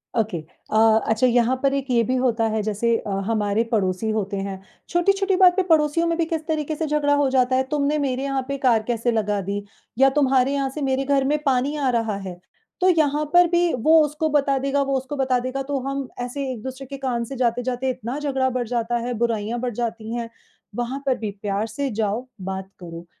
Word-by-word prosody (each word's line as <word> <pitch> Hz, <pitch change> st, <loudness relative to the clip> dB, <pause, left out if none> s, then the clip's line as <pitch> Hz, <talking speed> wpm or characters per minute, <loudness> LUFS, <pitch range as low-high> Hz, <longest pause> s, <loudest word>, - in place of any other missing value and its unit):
Okay, 220 Hz, -5 st, 0 dB, 0.3 s
अ, 220 Hz, 0 st, +5 dB
अच्छा 225 Hz, +3 st, +3 dB
यहाँ 245 Hz, +1 st, +3 dB
पर 275 Hz, 0 st, +3 dB
एक 275 Hz, -1 st, -2 dB
ये 235 Hz, -1 st, +3 dB
भी 255 Hz, +4 st, 0 dB
होता 245 Hz, -3 st, +1 dB
है 220 Hz, 0 st, -1 dB
जैसे 220 Hz, +2 st, +1 dB
अ, -, -, -7 dB, 0.2 s
हमारे 215 Hz, 0 st, +1 dB
पड़ोसी 200 Hz, -1 st, 0 dB
होते 205 Hz, -2 st, -2 dB
हैं, 195 Hz, -1 st, -5 dB, 0.3 s
छोटी-छोटी 390 Hz, +3 st, +2 dB
बात 365 Hz, -1 st, +6 dB
पे 380 Hz, -, +2 dB
पड़ोसियों 315 Hz, +2 st, +3 dB
में 335 Hz, 0 st, 0 dB
भी 335 Hz, -, +1 dB
किस 320 Hz, -1 st, -3 dB
तरीके 310 Hz, -1 st, -1 dB
से 320 Hz, -, -2 dB
झगड़ा 295 Hz, -1 st, +1 dB
हो 285 Hz, -1 st, +2 dB
जाता 255 Hz, -1 st, +2 dB
है, 260 Hz, -, +2 dB
तुमने 295 Hz, 0 st, +1 dB
मेरे 265 Hz, -2 st, -1 dB
यहाँ 275 Hz, -1 st, -1 dB
पे 275 Hz, 0 st, -2 dB
कार 240 Hz, -5 st, +2 dB
कैसे 240 Hz, 0 st, 0 dB
लगा 210 Hz, -2 st, 0 dB
दी? 200 Hz, +2 st, -3 dB, 0.3 s
या 270 Hz, +1 st, +6 dB
तुम्हारे 270 Hz, -1 st, +2 dB
यहाँ 275 Hz, -1 st, 0 dB
से 295 Hz, +3 st, -7 dB
मेरे 270 Hz, 0 st, 0 dB
घर 275 Hz, 0 st, +2 dB
में 295 Hz, +2 st, +2 dB
पानी 270 Hz, +2 st, +1 dB
आ 280 Hz, -3 st, 0 dB
रहा 225 Hz, -4 st, 0 dB
है। 175 Hz, -1 st, -8 dB, 0.4 s
तो 370 Hz, -, +5 dB
यहाँ 305 Hz, -3 st, +2 dB
पर 355 Hz, 0 st, +7 dB
भी 345 Hz, 0 st, +2 dB
वो 310 Hz, +7 st, +5 dB
उसको 300 Hz, +2 st, -2 dB
बता 280 Hz, -2 st, +2 dB
देगा, 275 Hz, +1 st, 0 dB
वो 275 Hz, 0 st, 0 dB
उसको 265 Hz, +2 st, -5 dB
बता 260 Hz, -2 st, +1 dB
देगा 255 Hz, +2 st, -3 dB
तो 280 Hz, -1 st, 0 dB
हम 275 Hz, -1 st, -3 dB
ऐसे 265 Hz, +3 st, -4 dB
एक 240 Hz, -4 st, -6 dB
दूसरे 260 Hz, +1 st, -6 dB
के 275 Hz, +1 st, -7 dB
कान 255 Hz, -3 st, -2 dB
से 270 Hz, -, -7 dB
जाते-जाते 245 Hz, +1 st, 0 dB
इतना 245 Hz, +1 st, -4 dB
झगड़ा 270 Hz, -3 st, 0 dB
बढ़ 250 Hz, -2 st, -2 dB
जाता 240 Hz, 0 st, -1 dB
है, 245 Hz, -, -2 dB
बुराइयाँ 230 Hz, 0 st, -1 dB
बढ़ 245 Hz, 0 st, -3 dB
जाती 230 Hz, -1 st, -3 dB
हैं। 235 Hz, -1 st, -4 dB, 0.5 s
वहाँ 245 Hz, +3 st, -3 dB
पर 260 Hz, -2 st, +1 dB
भी 215 Hz, -2 st, -4 dB
प्यार 205 Hz, +1 st, -1 dB
से 275 Hz, +5 st, -3 dB
जाओ 220 Hz, +3 st, -1 dB, 0.2 s
बात 190 Hz, 0 st, -5 dB
करो, 170 Hz, -1 st, -9 dB
255 Hz, 220 wpm, -23 LUFS, 225-280 Hz, 0.5 s, पर